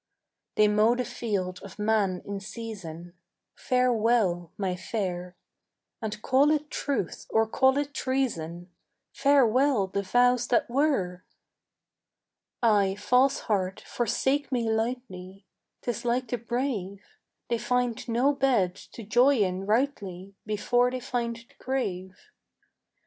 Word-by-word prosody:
"They 215 Hz, -, +5 dB
mow 215 Hz, +3 st, +4 dB
the 250 Hz, 0 st, -2 dB
field 200 Hz, -7 st, -3 dB
of 195 Hz, -, -11 dB
man 210 Hz, -4 st, +1 dB
in 200 Hz, 0 st, -4 dB
season: 195 Hz, -6 st, -8 dB, 0.4 s
Farewell, 225 Hz, -8 st, +1 dB
my 190 Hz, -3 st, -1 dB
fair, 180 Hz, -3 st, -4 dB, 0.7 s
And, 215 Hz, -2 st, -4 dB
call 270 Hz, +3 st, +4 dB
it 300 Hz, -1 st, 0 dB
truth 265 Hz, -, -3 dB
or 225 Hz, 0 st, +3 dB
call 265 Hz, +4 st, +3 dB
it 285 Hz, 0 st, -2 dB
treason, 175 Hz, -, -2 dB, 0.4 s
Farewell 270 Hz, -4 st, +3 dB
the 195 Hz, +1 st, -2 dB
vows 245 Hz, +4 st, +3 dB
that 240 Hz, -, +2 dB
were." 235 Hz, -10 st, 0 dB, 1.4 s
"Ay, 200 Hz, -4 st, +3 dB
false 250 Hz, +6 st, +2 dB
heart, 190 Hz, -3 st, -1 dB
forsake 265 Hz, +5 st, 0 dB
me 240 Hz, -3 st, 0 dB
lightly: 215 Hz, -5 st, -4 dB, 0.4 s
'Tis 240 Hz, -3 st, -3 dB
like 245 Hz, 0 st, 0 dB
the 245 Hz, -, -2 dB
brave. 225 Hz, -5 st, -3 dB, 0.4 s
They 235 Hz, -1 st, 0 dB
find 245 Hz, 0 st, -1 dB
no 250 Hz, +5 st, +3 dB
bed 250 Hz, -10 st, +2 dB
to 225 Hz, +4 st, -12 dB
joy 245 Hz, +7 st, +4 dB
in 190 Hz, -2 st, 0 dB
rightly 205 Hz, -6 st, -1 dB
Before 245 Hz, +4 st, +2 dB
they 255 Hz, 0 st, -4 dB
find 240 Hz, -2 st, -2 dB
the 230 Hz, 0 st, -17 dB
grave. 190 Hz, -8 st, -3 dB
225 Hz, 120 wpm, -27 LUFS, 195-250 Hz, 1.4 s, They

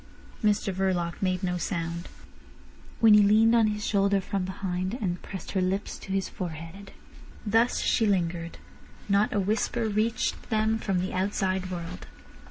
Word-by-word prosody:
Mr 205 Hz, -2 st, +2 dB
Verloc 180 Hz, -2 st, -1 dB
made 185 Hz, -1 st, 0 dB
no 180 Hz, -1 st, -1 dB
sound. 170 Hz, -1 st, -3 dB, 0.9 s
Winnie 210 Hz, -2 st, +8 dB
leaned 215 Hz, +3 st, +5 dB
on 225 Hz, -2 st, +5 dB
his 210 Hz, 0 st, -2 dB
shoulder 200 Hz, -1 st, +2 dB
from 195 Hz, 0 st, -2 dB
behind, 185 Hz, +1 st, -3 dB
and 180 Hz, -7 st, -3 dB
pressed 190 Hz, -, -7 dB
her 190 Hz, -, 0 dB
lips 190 Hz, +3 st, -2 dB
to 195 Hz, -, -9 dB
his 195 Hz, 0 st, 0 dB
forehead. 170 Hz, +3 st, -7 dB, 0.5 s
Thus 225 Hz, +3 st, +3 dB
she 225 Hz, -, +2 dB
lingered. 170 Hz, -3 st, -1 dB, 0.5 s
Not 200 Hz, +1 st, +3 dB
a 205 Hz, -, +1 dB
whisper 220 Hz, +3 st, 0 dB
reached 220 Hz, +3 st, -1 dB
them 220 Hz, 0 st, +1 dB
from 195 Hz, -5 st, 0 dB
the 185 Hz, -, -3 dB
outside 190 Hz, -1 st, -1 dB
world. 170 Hz, -, -6 dB
195 Hz, 150 wpm, -27 LUFS, 180-210 Hz, 0.9 s, Winnie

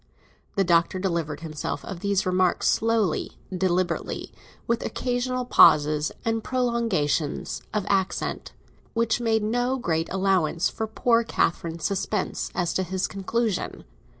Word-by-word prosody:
The 195 Hz, -, +3 dB
Doctor 170 Hz, +1 st, +3 dB
delivered 170 Hz, -5 st, -2 dB
himself 155 Hz, -2 st, -4 dB
of 190 Hz, -, -6 dB
these 200 Hz, +2 st, 0 dB
remarks 185 Hz, -1 st, +2 dB
slowly, 225 Hz, -7 st, +1 dB, 0.2 s
deliberately, 180 Hz, -1 st, -1 dB, 0.3 s
with 235 Hz, 0 st, 0 dB
occasional 250 Hz, 0 st, -1 dB
pauses 150 Hz, -8 st, +5 dB
and 225 Hz, -1 st, 0 dB
prolongations 230 Hz, -, 0 dB
of 210 Hz, -3 st, -1 dB
accent, 195 Hz, -2 st, -1 dB, 0.4 s
which 230 Hz, +1 st, +1 dB
made 220 Hz, -2 st, +2 dB
no 245 Hz, +4 st, 0 dB
great 165 Hz, -8 st, -1 dB
allowance 185 Hz, -3 st, +1 dB
for 220 Hz, -, -4 dB
poor 230 Hz, +1 st, +2 dB
Catherine's 165 Hz, -6 st, -1 dB
suspense 200 Hz, +1 st, -1 dB
as 175 Hz, -3 st, 0 dB
to -, -, +1 dB
his 185 Hz, +1 st, -1 dB
conclusion. 215 Hz, +2 st, -2 dB
190 Hz, 125 wpm, -25 LUFS, 170-230 Hz, 0.4 s, pauses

